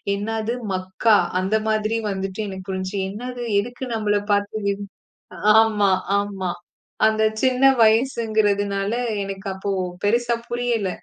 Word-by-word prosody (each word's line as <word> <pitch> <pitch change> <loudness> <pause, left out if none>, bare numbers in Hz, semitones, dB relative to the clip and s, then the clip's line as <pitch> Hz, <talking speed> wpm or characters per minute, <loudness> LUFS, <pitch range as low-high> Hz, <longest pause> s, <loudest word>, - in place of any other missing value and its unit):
என்னது 220 +3 -2 0.2
மக்கா 190 +4 +2 0.2
அந்த 195 +4 +1
மாதிரி 215 +1 0
வந்துட்டு 190 +1 -4
எனக்கு 190 -1 -8
புரிஞ்சு. 190 +1 -4
என்னது 245 +4 -6 0.2
எதுக்கு 245 +4 -5
நம்மளப் 205 -1 0
பார்த்து 205 +1 0
விம் 200 0 -2 0.7
ஆமா, 210 -3 +3 0.3
ஆமா. 195 -3 -3 0.6
அந்த 220 0 +2 0.2
சின்ன 260 0 +2 0.2
வயசுங்குறதுனால 215 -3 +2 0.3
எனக்கு 195 0 -7
அப்போ 195 +1 -4 0.3
பெருசா 235 +3 +2
புரியல. 240 -4 -1
210 Hz, 115 wpm, -22 LUFS, 195-225 Hz, 0.7 s, ஆமா